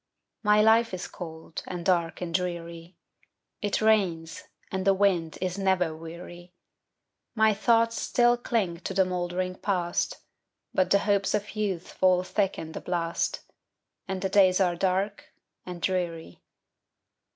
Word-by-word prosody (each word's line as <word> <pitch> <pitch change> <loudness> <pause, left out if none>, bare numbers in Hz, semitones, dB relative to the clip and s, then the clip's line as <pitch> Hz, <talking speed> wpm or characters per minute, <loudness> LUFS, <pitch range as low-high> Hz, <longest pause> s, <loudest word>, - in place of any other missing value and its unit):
My 210 0 +4
life 225 -1 +4
is 185 - -6
cold, 160 -2 -8
and 175 -1 -5
dark, 170 -2 +1
and 170 -2 -4
dreary; 170 -1 -4 0.6
It 205 -1 0
rains, 175 -8 +1 0.3
and 190 0 -2
the 195 0 +4
wind 185 -5 +1
is 185 +1 -2
never 185 -4 +1
weary; 175 +2 -10 0.8
My 220 -1 +4
thoughts 230 +1 +2
still 240 0 +3
cling 220 -8 -1
to 190 - -5
the 190 0 +4
moldering 180 0 -2
Past, 180 -3 -1 0.6
But 185 - +2
the 200 - +5
hopes 200 -1 +2
of 210 +1 -4
youth 195 -5 -2
fall 185 -1 +3
thick 195 +1 0
in 160 - -6
the - - -7
blast, 170 -2 -1 0.7
And 190 -1 -4
the 190 - 0
days 190 -1 +5
are 180 -2 +2
dark 190 +3 -1 0.3
and 180 -1 -6
dreary. 170 - -2
185 Hz, 140 wpm, -27 LUFS, 175-200 Hz, 0.8 s, the